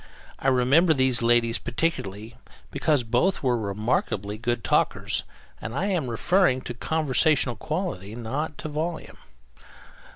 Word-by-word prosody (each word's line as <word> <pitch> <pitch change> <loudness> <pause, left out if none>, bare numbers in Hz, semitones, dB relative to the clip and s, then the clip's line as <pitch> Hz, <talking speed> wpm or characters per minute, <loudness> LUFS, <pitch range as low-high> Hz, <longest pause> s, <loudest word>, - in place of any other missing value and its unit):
I - - -2
remember 135 +6 +4
these 130 -2 +2
ladies 115 0 +3
particularly 115 - -3 0.4
because 150 -5 +1
both 125 +13 +1
were 125 -2 +2
remarkably 105 -1 -1
good 120 +1 -2
talkers - - +1 0.4
and 115 - -6
I 175 - 0
am 160 -9 -1
referring 130 +2 +2
to 120 - -6
conversational 145 -1 +1
quality, 115 - -4
not 135 +6 -4
to - - -6
volume. 160 +3 -4
125 Hz, 125 wpm, -25 LUFS, 115-155 Hz, 0.4 s, remember